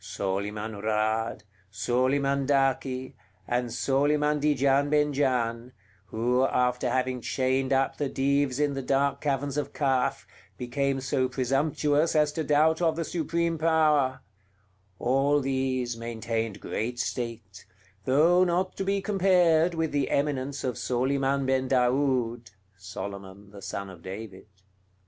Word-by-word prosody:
Soliman 100 +2 -4
Raad, 110 +1 -1 0.3
Soliman 130 +5 0
Daki, 135 -2 0 0.3
and 120 0 -1
Soliman 145 +4 +1
Di 150 0 +2
Gian 140 +1 +2
Ben 150 0 +2
Gian, 125 -3 -1 0.3
who, 125 +4 +1
after 125 -1 +1
having 130 0 -1
chained 130 +2 0
up 135 0 +1
the 145 -2 -1
Dives 140 0 0
in 145 -1 +1
the 135 - -3
dark 140 +1 0
caverns 140 -1 -1
of 145 - -3
Kaf, 135 -1 0 0.3
became 135 +2 -1
so 130 -1 0
presumptuous 145 +4 +1
as 150 -1 +3
to 160 +1 -3
doubt 155 +3 +3
of 165 -2 +2
the 165 0 -2
Supreme 170 0 -1
Power, 155 -5 +2 0.8
all 135 +3 +2
these 130 -3 -1
maintained 115 -1 -4
great 120 +3 -3
state, 115 -6 -5 0.4
though 165 +7 +4
not 185 +1 0
to - - -1
be 195 0 -1
compared 180 -4 +3
with 160 -1 -1
the 145 -1 0
eminence 140 -1 -1
of 125 -3 -2
Soliman 135 +2 0
Ben 130 0 +1
Daoud 125 -3 +1 0.3
[Solomon 100 +1 -8
the 100 -1 -11
son 100 0 -5
of 95 -3 -12
David]. 95 +1 -8
135 Hz, 130 wpm, -27 LUFS, 120-145 Hz, 0.8 s, though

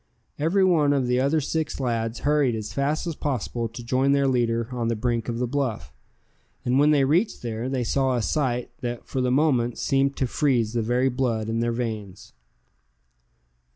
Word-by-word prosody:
Every 170 +6 +2
one 155 -6 +3
of 135 -3 +1
the 125 0 +1
other 140 +4 +2
six 155 +1 -2
lads 115 -3 -2
hurried 145 -5 +2
as 110 -1 -5
fast 145 +4 -1
as 170 - -2
possible 120 -5 -2
to 120 +2 -9
join 130 +3 +2
their 140 -1 +2
leader 115 -3 +1
on 120 -2 -2
the 115 - 0
brink 115 +1 -1
of 115 - -2
the 125 - 0
bluff; 130 -3 -3 0.7
and 125 +2 +2
when 145 +1 +5
they 145 -2 +4
reached 170 - +1
there, 115 +1 -3
they 130 -2 -1
saw 130 +2 +1
a 120 - -1
sight 125 -4 -1
that 120 -1 -5
for 130 - -2
the 125 - +1
moment 125 -4 +2
seemed 135 0 +1
to 130 - +1
freeze 120 -4 +1
the 120 - 0
very 125 +4 +1
blood 120 -4 -1
in 115 0 -1
their 120 0 0
veins. 110 -5 -5
125 Hz, 190 wpm, -25 LUFS, 115-140 Hz, 0.7 s, when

